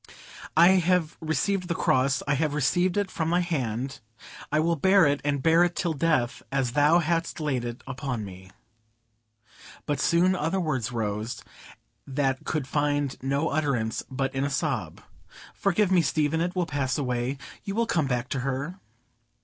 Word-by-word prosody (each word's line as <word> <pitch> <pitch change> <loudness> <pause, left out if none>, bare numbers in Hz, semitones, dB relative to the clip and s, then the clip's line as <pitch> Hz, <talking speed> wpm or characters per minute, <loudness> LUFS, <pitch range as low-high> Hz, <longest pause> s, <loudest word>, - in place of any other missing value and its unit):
"I 170 +2 +8
have 175 -2 +1
received 180 +4 0
the 170 - -1
Cross, 135 -1 +2
I 145 - +2
have 150 +1 0
received 175 +6 +1
it 205 -2 0
from 160 -1 -2
Thy 175 +1 +2
hand; 135 -5 -2 0.5
I 150 - +2
will 165 +2 +2
bear 190 +3 +5
it, 145 0 +1
and 140 -2 -1
bear 165 +1 +5
it 175 0 0
till 170 -3 -1
death, 150 -6 0
as 135 -3 0
Thou 150 +5 +4
hast 165 0 -1
laid 140 -6 -1
it 120 0 -6
upon 130 -4 -4
me." 95 -1 -11 1.4
But 145 -2 -1
soon 180 +4 +3
other 180 +2 -1
words 135 -8 -1
rose 110 0 -3 0.6
that 135 -1 -1
could 155 -4 -1
find 145 -1 0
no 140 +4 0
utterance 140 -7 0
but 135 0 -2
in 135 0 -1
a 140 - 0
sob,—"Forgive 155 - -2
me, 180 -2 +5
Stephen! 155 +1 +1
It 175 +2 -2
will 180 -1 +1
pass 140 -4 -1
away. 125 -1 -1 0.3
You 200 -1 -4
will 230 +1 +2
come 165 -10 0
back 125 -1 -1
to 135 - -2
her." 135 +7 -3
145 Hz, 165 wpm, -26 LUFS, 130-170 Hz, 1.4 s, I